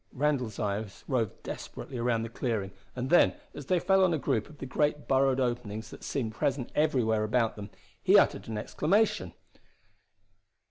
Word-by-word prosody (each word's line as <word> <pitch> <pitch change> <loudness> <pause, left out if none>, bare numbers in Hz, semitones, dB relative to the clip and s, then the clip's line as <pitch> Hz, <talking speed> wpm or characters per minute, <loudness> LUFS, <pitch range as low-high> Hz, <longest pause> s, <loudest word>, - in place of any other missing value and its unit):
Randall's 130 -6 0
eyes 105 -1 -3
roved 120 -7 -1
desperately 125 - -7
around 115 -1 +1
the 115 - -5
clearing; 110 -5 -2 0.2
and 125 +2 -3
then, 175 - +6 0.2
as - - -9
they 185 -2 +3
fell 190 +2 +4
on 175 -3 +3
a - - 0
group 110 -6 -1
of 150 - -14
the 135 - -6
great 150 +2 0
burrowed 135 0 +3
openings 120 -4 -2
that - - -11
seemed 115 -6 -2
present 130 +1 -1
everywhere 125 -8 +2
about 115 +1 +1
them, 105 -1 -8 0.3
he 195 +2 +6
uttered - - +3
an 110 -1 -4
exclamation. 195 - +1
125 Hz, 170 wpm, -29 LUFS, 110-150 Hz, 0.3 s, then